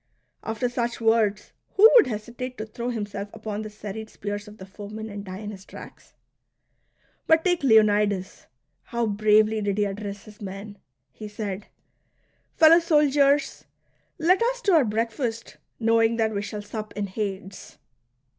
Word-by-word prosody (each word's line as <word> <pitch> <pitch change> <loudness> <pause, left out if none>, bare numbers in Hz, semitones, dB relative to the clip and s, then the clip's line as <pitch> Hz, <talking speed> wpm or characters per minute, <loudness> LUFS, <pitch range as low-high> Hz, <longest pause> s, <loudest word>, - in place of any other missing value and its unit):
After 225 +2 -2
such 240 -1 -2
words, 225 -2 +1 0.2
who 420 +3 +9
would 480 - +7
hesitate 240 +3 -6
to 215 - -4
throw 235 +2 -5
himself 205 -3 -4
upon 215 -1 -5
the 215 - -6
serried 210 +1 -8
spears 205 +1 -6
of 210 +1 -12
the 190 - -10
foemen, 210 +3 -8
and 200 0 -6
die 185 -1 -7
in 210 +1 -6
his 195 -2 -11
tracks - - -13 0.5
.'' - - -42
But 320 +1 +4
take 355 -2 +2
Leonidas: 210 -6 +2 0.4
how 235 -1 -1
bravely 215 +1 +3
did 200 -1 -1
he 210 - +2
address 200 0 -5
his 215 0 -15
men! 200 +1 -8 0.3
He 210 - -9
said: 205 -1 -5 0.4
" - - -44
Fellow 325 +1 +8
soldiers, 295 -3 +2 0.5
let 365 +5 +3
us - - 0
to 395 - +3
our 310 -6 +5
breakfast, 230 +2 -3 0.2
knowing 225 0 +3
that 220 -1 0
we 200 - -1
shall 205 0 -6
sup 215 +1 -7
in 205 - -1
Hades 195 -1 -6
215 Hz, 160 wpm, -25 LUFS, 205-235 Hz, 0.5 s, who